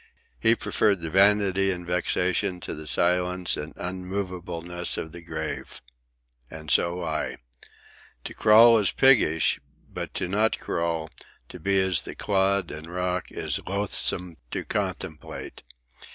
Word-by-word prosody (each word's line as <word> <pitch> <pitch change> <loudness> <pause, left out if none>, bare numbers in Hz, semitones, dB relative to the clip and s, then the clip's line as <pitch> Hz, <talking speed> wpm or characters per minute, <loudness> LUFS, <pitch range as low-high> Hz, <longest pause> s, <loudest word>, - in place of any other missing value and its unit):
He 115 +1 +4
preferred 100 -4 +1
the 80 -1 -4
vanity 95 0 +4
and 90 -2 -3
vexation 90 +1 0
to - - -5
the 75 0 -8
silence 90 +3 +1
and 75 +1 -6
unmovableness 90 -2 -4
of 80 - -5
the 85 +1 -10
grave. 80 -5 -5 0.7
And 80 -1 -7
so 85 +1 +2
I. 80 -2 -2 0.9
To - - -6
crawl 115 +1 +7
is 100 - +2
piggish; 105 - +4 0.3
but - - -6
to 95 - -1
not 105 +4 +1
crawl, 85 -2 -2 0.4
to - - -10
be 100 +3 +2
as 95 -2 +2
the - - -8
clod 100 -2 +1
and 80 +3 -8
rock, 90 0 -2
is - - -2
loathsome 90 -3 -1
to - - -4
contemplate. 75 -2 -4
90 Hz, 135 wpm, -26 LUFS, 85-100 Hz, 0.9 s, crawl